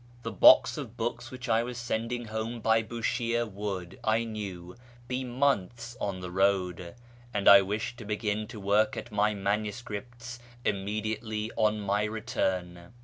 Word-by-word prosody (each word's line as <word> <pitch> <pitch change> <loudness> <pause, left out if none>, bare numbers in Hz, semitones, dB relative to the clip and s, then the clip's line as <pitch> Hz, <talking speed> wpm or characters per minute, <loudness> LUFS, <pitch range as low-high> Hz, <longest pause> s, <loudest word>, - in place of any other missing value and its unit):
The - - -3
box - - +7
of 115 +2 -8
books 120 +2 -3
which 130 -1 -8
I 115 -1 +3
was 120 0 -5
sending 120 0 -2
home 110 +2 -4
by 110 0 +3
Bushire 115 +1 -1
would, 95 -3 -5
I 110 +1 +2
knew, 95 -6 -6 0.3
be 130 +1 -2
months 120 -2 -1
on 95 -2 -2
the 90 -1 -6
road, 90 -2 0 0.4
and 100 -1 0
I 100 0 +10
wished 105 +5 -3
to 115 - -8
begin 105 0 -2
to 110 - -9
work 105 +2 +2
at 120 - -6
my 105 0 +2
manuscripts 110 +4 -4 0.3
immediately 110 +2 -2
on 110 -1 +2
my 100 +1 +1
return. 95 -6 -3
110 Hz, 150 wpm, -29 LUFS, 100-115 Hz, 0.4 s, I